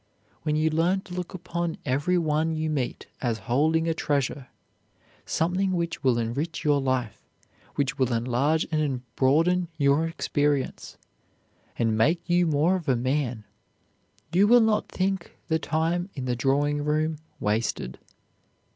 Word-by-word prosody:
When 150 -1 0
you 155 +1 +2
learn 175 +5 +2
to 190 -2 -11
look 180 +1 -5
upon 170 -2 -3
every 145 +7 +1
one 160 0 +1
you 155 0 -1
meet 135 -5 -2 0.2
as 120 -4 0
holding 160 +6 +2
a 165 - +2
treasure, 140 -3 -1 0.8
something 185 +4 0
which 170 -2 -2
will 130 -3 +3
enrich 140 +8 -2
your 145 -2 +3
life, 125 -5 -1 0.5
which 140 -1 -1
will 130 -1 +2
enlarge 125 +7 +1
and 145 -5 0
broaden 165 +7 +3
your 145 +2 +3
experience, 145 -4 -1 0.8
and 115 -2 +1
make 160 +10 +2
you 175 0 +3
more 155 +4 +3
of 175 -6 -3
a 130 - +4
man, 125 -2 -1 0.9
you 195 +4 +5
will 245 +2 +7
not 220 -1 +1
think 190 -1 -2
the 160 0 +2
time 165 +4 -1
in 130 -3 -4
the 125 -1 0
drawing 145 +3 +1
room 155 +1 0 0.2
wasted. 105 - -1
150 Hz, 145 wpm, -26 LUFS, 130-170 Hz, 0.9 s, will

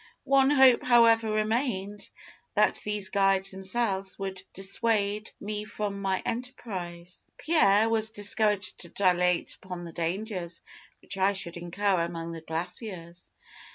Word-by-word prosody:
One 270 0 +4
hope, 265 -4 +6
however, 230 -2 +5
remained: 215 -2 -1 0.5
that - - +3
these 210 -2 -3
guides 195 -1 +3
themselves 195 0 -1
would 190 -1 -5
dissuade 205 +1 +1
me 210 0 -4
from 205 -2 -4
my 190 -1 -1
enterprise. 185 -8 -6
Pierre 220 -10 +3
was 220 -1 +1
encouraged 205 -2 0
to 170 - -11
dilate 180 -2 +1
upon 180 -2 -7
the 170 -1 -9
dangers 175 0 -3 0.4
which 195 - -5
I 195 +2 +3
should 170 -3 -4
incur 180 +2 0
among 170 0 -4
the 165 -1 -7
glaciers. 170 +2 -5
195 Hz, 125 wpm, -28 LUFS, 180-220 Hz, 0.5 s, hope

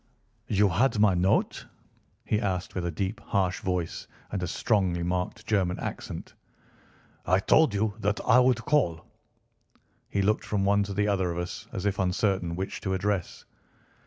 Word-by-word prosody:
"You 105 0 +3
had 115 +6 +2
my 105 -2 +5
note?" 90 +2 +1 0.6
he 105 - +1
asked 90 -3 -2
with 90 -2 -2
a - - -2
deep 95 +7 -3
harsh 95 -3 -1
voice 90 -3 -3 0.2
and 100 - -2
a 90 - -2
strongly 90 -3 0
marked 90 +5 -2
German 95 -4 0
accent. - - -6 0.9
"I 95 - +3
told 125 +3 +4
you 105 +1 0
that 105 0 0
I 125 - +6
would 125 -2 +2
call." 85 - +1 1.0
He 100 - 0
looked 105 +2 +1
from 100 -2 -1
one 100 +1 +3
to 100 0 -6
the 105 +1 +1
other 95 -3 +1
of 85 - -5
us, 90 0 -5
as 95 - -4
if 100 -1 0
uncertain 95 -2 0
which 95 +2 -4
to 95 -2 -1
address. 95 -2 -2
95 Hz, 165 wpm, -27 LUFS, 90-105 Hz, 1.0 s, I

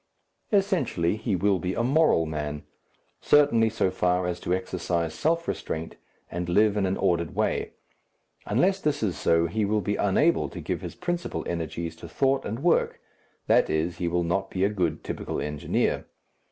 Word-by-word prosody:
Essentially 190 - +1
he 110 -2 -1
will 95 +1 +2
be 90 +2 -2
a 115 - 0
moral 135 - +3
man, 75 -1 -4 0.6
certainly 120 -7 +4
so 110 -4 0
far 90 -1 +1
as 90 0 -2
to 90 - -4
exercise 85 -3 -1
self 165 - 0
restraint 80 +1 -4 0.4
and 90 0 -3
live 105 +3 +4
in 100 -2 +1
an 95 - -1
ordered 85 -4 0
way. - - -1 0.7
Unless 185 - +2
this 150 -8 0
is 95 -6 0
so, 85 +2 +2
he 105 +6 -1
will 105 +1 +1
be 100 +2 -1
unable 150 - +2
to - - -8
give - - -3
his - - -7
principal 175 -1 -3
energies 85 0 -4
to 85 - -10
thought 135 +7 +1
and 115 +7 -4
work 175 - +2 0.5
that - - +4
is, 80 +3 -1
he 85 - -1
will 85 0 +1
not 95 +3 -1
be 95 - -1
a 100 - +4
good 90 -7 -1
typical - - -4
engineer. 75 -1 -1
95 Hz, 175 wpm, -26 LUFS, 85-115 Hz, 0.7 s, certainly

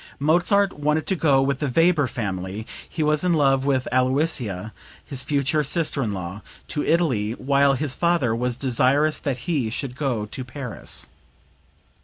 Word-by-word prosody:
Mozart 180 +7 +3
wanted 150 +1 0
to 190 - 0
go 140 -6 +3
with 140 -1 0
the 150 - -1
Weber 165 0 +3
family 100 -2 -4 0.2
(he 160 - -2
was 150 +1 +1
in 180 -1 +2
love 135 -3 +3
with 135 -2 +1
Aloysia, 125 - 0 0.3
his 135 -2 -1
future 145 +2 0
sister 150 -1 0
in 110 -5 -1
law) 95 +1 -5 0.3
to 150 - -2
Italy 125 -11 +1
while 140 +2 +2
his 140 0 -1
father 170 -10 +1
was 125 0 -2
desirous 135 +4 +2
that 130 -4 -3
he 145 -10 0
should 125 +2 -4
go 130 -7 -1
to 115 +5 -6
Paris.) 125 -1 -5
135 Hz, 160 wpm, -23 LUFS, 120-150 Hz, 0.3 s, Mozart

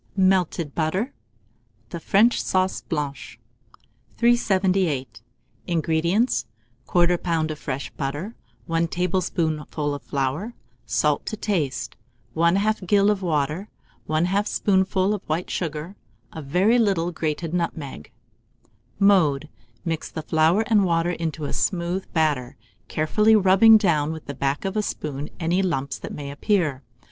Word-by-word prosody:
MELTED 185 -5 +2
BUTTER 185 - -1 0.8
(the 170 - -6
French 210 +8 +3
Sauce 185 0 0
Blanche). 145 -4 -4 0.8
378. 190 - +1 0.5
INGREDIENTS. 170 - +1 0.4
1/4 175 0 +3
lb. 160 -3 -1
of 155 - -7
fresh 135 0 -4
butter, 145 +10 -4 0.3
1 165 0 0
tablespoonful 165 -4 -1
of 145 - -5
flour, 145 - -3 0.3
salt 145 +7 +1
to 215 - -3
taste, 170 -12 -2 0.4
1/2 190 +4 +2
gill 200 +2 +4
of 200 -2 -2
water, 155 +3 -1 0.4
1/2 180 +6 +1
spoonful 190 0 +1
of 205 - -3
white 160 +3 -2
vinegar, 160 +2 -4 0.4
a 160 - -6
very 185 - +2
little 190 -6 +1
grated 160 0 -3
nutmeg. 155 - -4 0.9
Mode. 160 -8 +3 0.4
Mix 165 -2 -3
the 160 - -6
flour 160 +7 +3
and 215 -4 +3
water 170 -1 +1
to 160 -2 -3
a - - -4
smooth 180 +1 -1
batter, 145 -6 0 0.3
carefully 210 +8 +3
rubbing 210 +3 +7
down 160 -7 +1
with 160 -1 -7
the 140 - -5
back 140 +5 -2
of 195 - -2
a 215 - +2
spoon 150 -7 -4
any 175 +2 +1
lumps 140 -8 -2
that - - -7
may 140 -1 -6
appear. 150 -3 0
170 Hz, 130 wpm, -23 LUFS, 150-195 Hz, 0.9 s, rubbing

